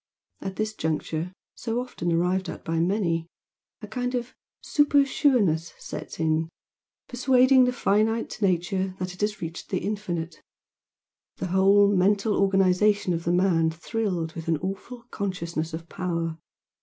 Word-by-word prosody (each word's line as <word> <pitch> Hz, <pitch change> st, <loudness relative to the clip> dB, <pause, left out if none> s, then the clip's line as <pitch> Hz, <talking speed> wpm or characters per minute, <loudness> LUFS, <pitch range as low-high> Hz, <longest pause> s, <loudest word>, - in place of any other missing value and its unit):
At 190 Hz, -1 st, -5 dB
this 215 Hz, +1 st, -2 dB
juncture, 160 Hz, 0 st, -2 dB, 0.2 s
so 230 Hz, 0 st, -3 dB
often 245 Hz, -9 st, -3 dB
arrived 180 Hz, +2 st, +1 dB
at -, -, -8 dB
by 165 Hz, 0 st, 0 dB
many, 170 Hz, -2 st, 0 dB, 0.6 s
a -, -, -5 dB
kind 250 Hz, +3 st, -2 dB
of 245 Hz, 0 st, -3 dB, 0.3 s
super 290 Hz, -1 st, +4 dB
sureness 205 Hz, -, +2 dB
sets -, -, -8 dB
in, 160 Hz, 0 st, +1 dB, 0.6 s
persuading 255 Hz, 0 st, +5 dB
the 250 Hz, -, +2 dB
finite 225 Hz, 0 st, 0 dB
nature 185 Hz, 0 st, 0 dB
that 185 Hz, -1 st, -4 dB
it 180 Hz, -, -11 dB
has 210 Hz, -2 st, -1 dB
reached 165 Hz, +1 st, -6 dB
the 185 Hz, -, -1 dB
infinite. 175 Hz, -6 st, -3 dB, 0.9 s
The -, -, -4 dB
whole 200 Hz, +1 st, +5 dB
mental 200 Hz, +3 st, +2 dB
organisation 195 Hz, 0 st, +3 dB
of 165 Hz, 0 st, -3 dB
the 170 Hz, -, +2 dB
man 175 Hz, -3 st, +3 dB
thrilled 170 Hz, -1 st, -2 dB
with 165 Hz, -1 st, -7 dB
an 165 Hz, -1 st, +2 dB
awful 195 Hz, +8 st, -6 dB
consciousness 170 Hz, -5 st, -3 dB
of 165 Hz, +1 st, -7 dB
power. 165 Hz, -3 st, -3 dB
190 Hz, 145 wpm, -26 LUFS, 165-215 Hz, 0.9 s, persuading